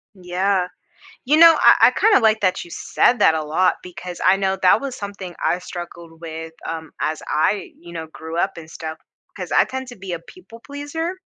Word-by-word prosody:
Yeah. 185 +1 0 0.6
You 290 +4 +3
know, 330 0 +8
I - - +7
I - - +3
kinda 430 - +4
like 220 -1 +3
that 185 -2 0
you 170 - -15
said 245 - +1
that 160 - +5
a 155 - -2
lot, 170 +5 +2
because 180 0 -9
I 185 - +5
know 195 0 0
that 185 +3 +5
was 275 -2 -5
something 200 -3 -7
I 175 - +2
struggled 170 -2 -9
with, 160 0 -7 0.2
um, 160 -1 -5
as 155 0 -2
I, 195 +7 0
you 170 0 -13
know, 160 -1 -6
grew 160 +1 -7
up 190 +3 +1
and 160 -1 -10
stuff, 160 -1 -7 0.4
'cause - - -6
I - - +5
tend 260 0 -6
to 245 - -10
be 190 -1 -7
a 170 - -3
people 230 - -15
pleaser. 320 +7 -5
185 Hz, 205 wpm, -21 LUFS, 165-230 Hz, 0.6 s, know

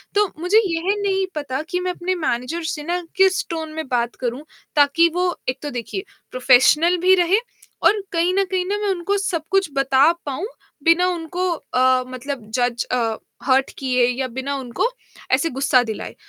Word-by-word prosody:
तो 415 +1 +4 0.2
मुझे 360 +5 +3
यह 345 +2 0
नहीं 385 -1 +1
पता 275 -2 -3
कि 360 - -1
मैं 365 0 -1
अपने 360 +1 -2
मैनेजर 310 +1 -2
से 300 - -6
ना 350 +3 -2 0.2
किस 380 0 +3
टोन 320 -2 -4
में 315 -1 -5
बात 240 -2 -1
करूँ, 250 +3 -3 0.3
ताकि 295 +4 +4
वो 360 0 +1
एक 255 - -3
तो 295 - -3
देखिए, 245 - -5 0.3
प्रोफेशनल 270 +7 +4
भी 370 +2 +5
रहे 360 +2 +3 0.5
और 415 -1 +4
कहीं 345 +1 +1
न 395 - +3
कहीं 365 -1 0
ना 405 +2 -1
मैं 415 - -1
उनको 385 +2 0
सब-कुछ 385 -1 0
बता 275 +2 +4
पाऊँ 290 +7 -3 0.4
बिना 335 +3 +4
उनको 355 +1 -2
अ, 255 -4 +1
मतलब 255 -2 -6
जज़ 245 -1 0
अ, 230 -3 0 0.3
हर्ट 265 0 +3
किए 255 -2 +2
या 255 +1 -1
बिना 265 +3 -4
उनको 250 - -2 0.5
ऐसे 275 +6 +3
गुस्सा 265 -1 +3
दिलाए। 220 -3 -6
315 Hz, 175 wpm, -21 LUFS, 255-360 Hz, 0.5 s, भी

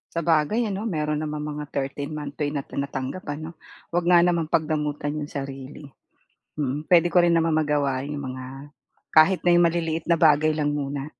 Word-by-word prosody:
Sabagay 165 +7 +2
ano, 210 +4 -3
meron 150 -4 -1
namang 150 -1 -4
mga 150 -1 -6
thirteen 140 +2 -4
month 145 -1 -7
pay 145 - +1
na 145 -2 -3
tinatanggap 140 +5 -5
ano? 155 +3 -5 0.4
'Wag 175 0 +1
nga 175 -1 +6
namang 170 -3 +1
pagdamutan 150 -2 -1
'yong 145 - -5
sarili, 135 0 -7 0.7
mm. 145 +2 -3
Puwede 175 -1 +6
ko 175 0 +4
rin 170 - +4
namang 165 -1 +1
magawa 145 -4 +1
'yong 145 +1 -5
mga 130 -2 -6 0.7
kahit 165 +4 +6
na 175 - +6
'yong 175 - +5
maliliit 165 -1 -2
na 165 - +4
bagay 155 -1 +4
lang 150 -1 0
muna. 140 -1 -3
150 Hz, 175 wpm, -24 LUFS, 145-165 Hz, 0.7 s, nga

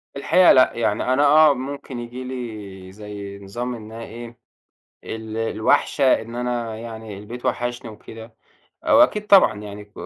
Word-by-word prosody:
الحقيقة 175 +6 +5
لأ، 130 0 +5
يعني 115 +2 0
أنا 145 +3 +3
آه، 150 +1 +6
ممكن 135 -1 -6
ييجي 120 +2 -7
لي 105 -7 -8
زي 100 -1 -9
نظام 120 +6 -5
إنها 110 0 -9
إيه 120 +1 -10 0.7
ال 110 0 -6
الوَحشة 115 +4 +2
إن 115 +1 -9
أنا 120 -2 -3
يعني 110 -2 -8
البيت 115 +5 -9
وحشني 120 -1 -2
وكده 110 +1 -12 0.5
آآ، - - +1
وأكيد 280 -8 +4
طبعًا 200 - +6
يعني 105 0 -9
ك 105 - -30
115 Hz, 150 wpm, -22 LUFS, 110-130 Hz, 0.7 s, آه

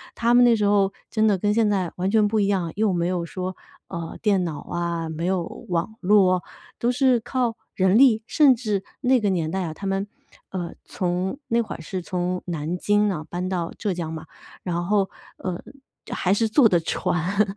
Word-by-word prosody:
他 235 +1 +2
们 245 0 +7
那 240 -1 +6
时 210 -2 +1
候 200 -1 +3 0.2
真 220 -1 +1
的 200 -3 +3
跟 205 +2 +1
现 225 -1 +3
在 190 -4 0
完 185 +2 0
全 215 -1 +4
不 215 +1 +1
一 200 - +2
样， 185 -5 0
又 210 0 +2
没 170 0 0
有 180 -2 -1
说， 185 +2 -5 0.3
呃， 170 -3 -6
电 200 -4 +2
脑 160 -4 -4
啊， 170 -1 -3
没 160 +2 -4
有 185 -1 +1 0.3
网 175 +5 -1
络， 185 -2 +4 0.4
都 240 - +2
是 255 -1 +3
靠 245 -1 -1 0.2
人 190 +2 +3
力。 230 -4 +5
甚 290 -4 +5
至 210 -5 -2 0.2
那 260 0 +4
个 210 -3 +1
年 165 -4 0
代 190 0 -1
啊， 160 -3 -4
他 195 +5 -6
们， 195 +1 -1 0.4
呃， 175 -3 -4
从 185 +6 -2
那 235 +1 +2
会 225 - -5
儿 - - -9
是 185 +3 -4
从 180 +1 -2
南 165 0 -3
京 205 +2 +2
呢 165 -6 -2
搬 180 +1 -3
到 175 -3 -2
浙 205 -3 -1
江 170 -2 -4
嘛， 160 0 -7 0.4
然 175 -1 -2
后， 200 0 +2 0.3
呃， 180 -2 -4 0.5
还 185 - +1
是 225 +2 +2
坐 245 +2 +6
的 175 -3 +3
船， 195 +5 0
190 Hz, 220 characters per minute, -24 LUFS, 175-215 Hz, 0.5 s, 们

